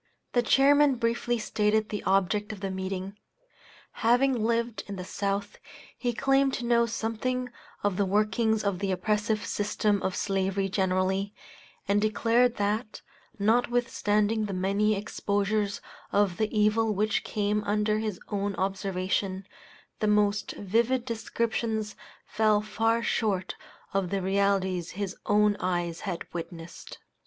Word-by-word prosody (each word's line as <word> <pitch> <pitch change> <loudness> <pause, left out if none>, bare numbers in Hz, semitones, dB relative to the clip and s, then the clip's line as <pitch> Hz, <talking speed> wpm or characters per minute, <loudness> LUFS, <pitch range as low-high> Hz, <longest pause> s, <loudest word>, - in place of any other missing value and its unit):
The 245 - +4
chairman 280 +3 +5
briefly 240 0 0
stated 215 0 +1
the 210 - -3
object 195 +2 +1
of 210 - -8
the 195 -1 -2
meeting. 190 +1 -4 0.8
Having 245 0 +3
lived 230 -2 0
in 200 - -5
the 180 -1 -6
South, 200 +1 -3 0.4
he 245 - -1
claimed 270 +2 +2
to 245 - -4
know 235 0 +3
something 235 +3 -2 0.3
of 205 -3 0
the 200 - +2
workings 215 +2 +1
of 200 -3 -1
the 195 -1 -1
oppressive 210 +3 0
system 205 -1 0
of 190 - -1
slavery 195 0 0
generally, 190 +1 0 0.5
and 200 +1 +2
declared 230 +3 +2
that, 210 +2 -2 0.4
notwithstanding 220 -1 +1
the 200 -2 -4
many 200 +3 +1
exposures 205 0 -1 0.3
of 200 -3 +2
the 215 -1 0
evil 215 0 +2
which 215 +2 +1
came 210 0 -1
under 210 +1 +1
his 215 -4 -3
own 200 -1 -2
observation, 190 0 -2 0.5
the 215 - +1
most 210 0 +2
vivid 235 +5 0
descriptions 225 -2 -2 0.3
fell 215 -1 +2
far 225 +2 0
short 195 -6 0 0.4
of 195 -2 0
the 195 0 -1
realities 190 -2 +1
his 200 -2 -3
own 210 0 +4
eyes 175 -2 -1
had 185 -4 -4
witnessed. 165 0 -8
210 Hz, 130 wpm, -28 LUFS, 195-225 Hz, 0.8 s, chairman